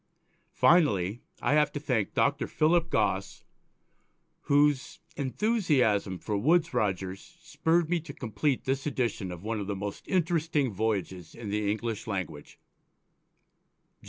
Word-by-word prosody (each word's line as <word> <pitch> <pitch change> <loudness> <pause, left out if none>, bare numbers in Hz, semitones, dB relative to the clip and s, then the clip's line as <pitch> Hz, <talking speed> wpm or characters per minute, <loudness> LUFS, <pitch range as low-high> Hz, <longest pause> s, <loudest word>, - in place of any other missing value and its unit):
Finally 105 - +3 0.2
I - - +2
have 150 -1 +3
to 145 - -3
thank 125 -8 -1
Dr. 140 +1 +1
Philip 165 +2 +2
Gosse, 100 - -1 1.0
whose 145 -2 +2 0.2
enthusiasm 135 - +1
for 105 +5 -3
Woodes 165 +6 +3
Rogers 95 - -2
spurred 160 +1 +1
me 175 +1 +1
to 160 -2 -9
complete 135 +2 -1
this 135 +2 -1
edition 120 -9 -2
of 90 +1 -8
one 110 0 -2
of 100 - -4
the 100 - -2
most 100 +1 -6
interesting 165 - +1
voyages 95 -5 -2
in 110 -3 -6
the 105 0 0
English 110 +1 -3
language. 90 -8 -5
125 Hz, 130 wpm, -28 LUFS, 100-155 Hz, 1.0 s, Finally